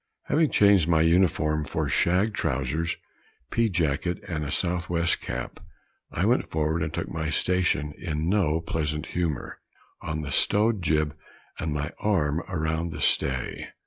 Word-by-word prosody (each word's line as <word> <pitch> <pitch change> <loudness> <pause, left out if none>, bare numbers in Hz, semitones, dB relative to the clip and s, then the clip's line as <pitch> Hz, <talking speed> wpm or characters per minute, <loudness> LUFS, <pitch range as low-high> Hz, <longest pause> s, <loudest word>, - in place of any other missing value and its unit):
Having 155 -1 +2
changed 100 -5 +5
my 80 -2 +3
uniform 80 -2 +2
for - - -2
shag 95 +5 +2
trowsers, 70 +3 -1 0.5
pea 115 -1 +2
jacket 85 -1 0
and 80 -3 -3
a 70 - -4
south 85 +2 -1
west 85 -1 +1
cap, 65 -1 -5 0.5
I - - 0
went - - +2
forward 80 +1 0
and 80 -1 -1
took 85 0 -3
my 80 -2 -2
station, 75 -3 +1
in 75 +1 -2
no 85 -5 +2
pleasant 75 -2 -2
humor, 85 -7 -2 0.4
on 80 0 -3
the 75 -1 -5
stowed 105 +7 +3
jib, 75 -2 +1 0.4
with 80 - -2
my 75 +2 -2
arm 80 -8 +1
around 80 -1 -1
the - - -7
stay. 65 -2 +1
80 Hz, 150 wpm, -26 LUFS, 75-90 Hz, 0.5 s, changed